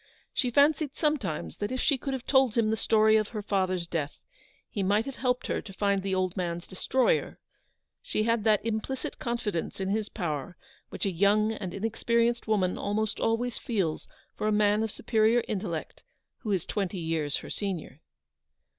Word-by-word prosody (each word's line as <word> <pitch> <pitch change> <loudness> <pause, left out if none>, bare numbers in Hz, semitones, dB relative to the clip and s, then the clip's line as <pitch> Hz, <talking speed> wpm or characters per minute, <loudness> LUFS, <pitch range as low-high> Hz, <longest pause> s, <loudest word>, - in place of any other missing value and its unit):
She 250 - +1
fancied 285 +2 +3
sometimes 240 - -1
that 205 - -3
if 255 - -2
she 280 - +3
could 275 +1 -3
have 260 -2 -4
told 265 -5 +4
him 220 -2 +3
the - - +2
story 220 0 +4
of 215 -1 +1
her 215 -2 -5
father's 185 -3 0
death, 155 -4 -3 0.5
he 205 - -3
might 205 +4 +2
have 275 - -6
helped 250 -1 0
her - - -1
to 195 - -11
find 200 0 +1
the 190 0 -1
old 185 -1 0
man's 175 -2 -2
destroyer. 245 +7 +1 0.6
She 215 - -1
had 230 -1 +1
that 215 -1 +3
implicit 230 +4 -3
confidence 225 -9 -2
in 190 0 -1
his 215 +1 0
power 160 - -3 0.3
which - - -3
a 195 - +1
young 205 +4 +3
and 205 -5 -4
inexperienced 235 +4 0
woman 195 -4 +1
almost 210 +1 -1
always 230 +2 0
feels 190 -10 -1 0.3
for 215 - -2
a - - +3
man 210 0 +3
of 220 - 0
superior 220 +2 +2
intellect 175 -6 -4 0.4
who 215 - -3
is 185 -4 0
twenty 195 -2 -2
years 160 -3 -1
her - - -7
senior. 175 -8 -4
210 Hz, 180 wpm, -28 LUFS, 185-230 Hz, 0.6 s, told